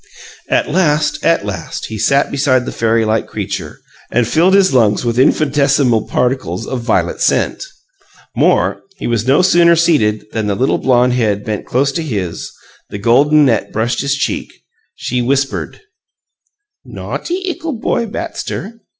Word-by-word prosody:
At - - +1
last, 150 -2 0
at - - +2
last, - - -5
he 110 -1 -7
sat 140 +6 +2
beside 130 -3 +1
the - - -4
fairy 115 0 +1
like 110 0 0
creature, 100 -7 -6 0.3
and 120 -1 +1
filled 175 +7 +3
his 195 -6 +4
lungs 110 -2 +2
with 120 +1 0
infinitesimal 140 -4 +2
particles 125 -6 -1
of 130 -2 -4
violet 115 - -1
scent. - - +1 0.7
More: - - +2 0.2
he - - -6
was 115 -1 -1
no 145 +7 +4
sooner 170 -2 +5
seated 145 -12 +1
than 110 -2 -2
the 100 - 0
little 130 +6 0
blonde 125 -1 +2
head 105 -5 0
bent 105 -1 -4
close 140 +3 +1
to 150 - -3
his; 100 - -4 0.4
the - - -6
golden 140 +8 +4
net 120 -4 0
brushed 120 +3 -1
his 140 +1 0
cheek. 140 - -3 0.4
She 125 0 -2
whispered: 135 +2 -1 1.0
"No'ty 375 +2 -5
ickle 330 -3 -3
boy 230 +1 -1
Batster! 220 +1 -6
130 Hz, 150 wpm, -15 LUFS, 110-150 Hz, 1.0 s, sooner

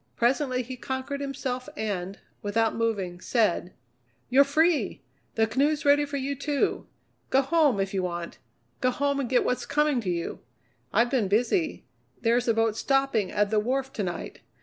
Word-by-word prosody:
Presently 255 +1 +1
he 255 +2 -7
conquered 265 +3 -4
himself, 270 -1 -4
and, 195 -3 -3 0.2
without 220 +2 +1
moving, 200 -6 -1
said: 205 -6 +1 0.6
"You're 270 +3 +7
free! 285 - +1 0.3
The 225 - +3
canoe's 285 +7 +1
ready 290 +1 +5
for 285 0 -4
you, 275 +1 -2
too. 280 +1 -1 0.4
Go 270 +1 +4
home 285 -5 +3
if 195 0 -1
you 190 - 0
want 175 -2 -4 0.4
go 255 - +2
home 280 +2 0
and 260 -4 -2
get 255 -1 +3
what's 250 - -1
coming 295 -3 +2
to 195 - -3
you! 170 -1 -3 0.5
I've 240 +1 +3
been 245 -7 +2
busy. 245 - +1 0.3
There's 240 +1 +2
a 230 - +4
boat 225 -1 +2
stopping 270 -8 +1
at 205 0 +1
the 215 - +3
wharf 265 +4 -1
to - - -3
night. 175 -3 -4
250 Hz, 170 wpm, -27 LUFS, 210-280 Hz, 0.6 s, You're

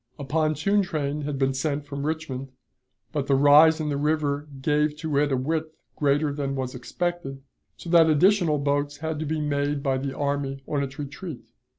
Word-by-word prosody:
A 145 - -6
pontoon 155 +7 +1
train 150 -5 -2
had 145 -1 -3
been 135 0 +1
sent 140 +2 -2
from 140 0 -4
Richmond, 155 -4 -3 0.6
but 145 -3 -2
the 140 - +3
rise 150 +3 +6
in 155 -1 -2
the 145 - -1
river 150 -1 0
gave 150 +2 +1
to 155 -2 -3
it 145 0 +1
a 135 - +2
width 155 +4 -2 0.2
greater 145 0 +1
than 140 -1 -3
was 130 -1 -3
expected, 135 +1 -4 0.3
so - - -11
that 165 -2 +6
additional 175 0 +4
boats 145 0 -1
had 160 0 -3
to 155 - -3
be 155 +1 -1
made 145 -1 -1
by 135 -1 +1
the 135 0 -4
army 140 -1 -2
on 145 -2 -1
its 135 -1 -5
retreat. 145 -2 -7
145 Hz, 190 wpm, -25 LUFS, 140-155 Hz, 0.6 s, rise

